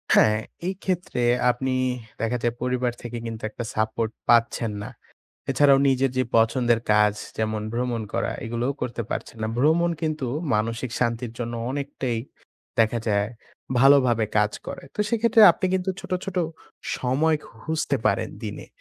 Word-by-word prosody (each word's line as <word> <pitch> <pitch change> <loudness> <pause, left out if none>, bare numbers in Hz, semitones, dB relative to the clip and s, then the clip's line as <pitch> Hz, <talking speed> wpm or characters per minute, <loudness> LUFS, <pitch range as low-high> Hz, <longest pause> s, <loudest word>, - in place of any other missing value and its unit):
হ্যাঁ, 110 0 +5 0.3
এই 190 - 0
ক্ষেত্রে 180 -8 -1 0.3
আপনি 130 +2 -2 0.5
দেখা 115 +2 0
যায় 120 -1 +1
পরিবার 125 -1 0
থেকে 120 0 -6
কিন্তু 115 -1 -5
একটা 120 - -6
সাপোর্ট 110 +1 0 0.2
পাচ্ছেন 115 -1 +3
না। 110 - -6 0.6
এছাড়াও 140 -2 +5
নিজের 135 0 +2
যে 130 - +3
পছন্দের 115 0 +3
কাজ 105 -1 +5 0.3
যেমন, 110 -1 -1
ভ্রমণ 120 -1 -1
করা - - -1
এগুলোও 120 +4 -1
করতে 120 -1 -2
পারছেন - - -4
না। 110 - 0
ভ্রমণ 160 +6 +3
কিন্তু 155 -4 -1 0.3
মানসিক 115 +3 -1
শান্তির 115 -1 -1
জন্য 120 -1 -3 0.2
অনেকটাই 135 -4 -3 0.6
দেখা 115 +1 +3
যায় 100 0 +2 0.5
ভালোভাবে 130 -4 +5
কাজ 105 0 +2
করে। - - -6
তো - - -21
সেক্ষেত্রে 230 0 +3
আপনি 185 - -2
কিন্তু 185 0 0
ছোট, - - -8
ছোট 195 -1 -6 0.6
সময় 150 +5 +2
খুঁজতে 140 +5 -2
পারেন - - +1
দিনে, - - -6
120 Hz, 145 wpm, -24 LUFS, 115-140 Hz, 0.6 s, হ্যাঁ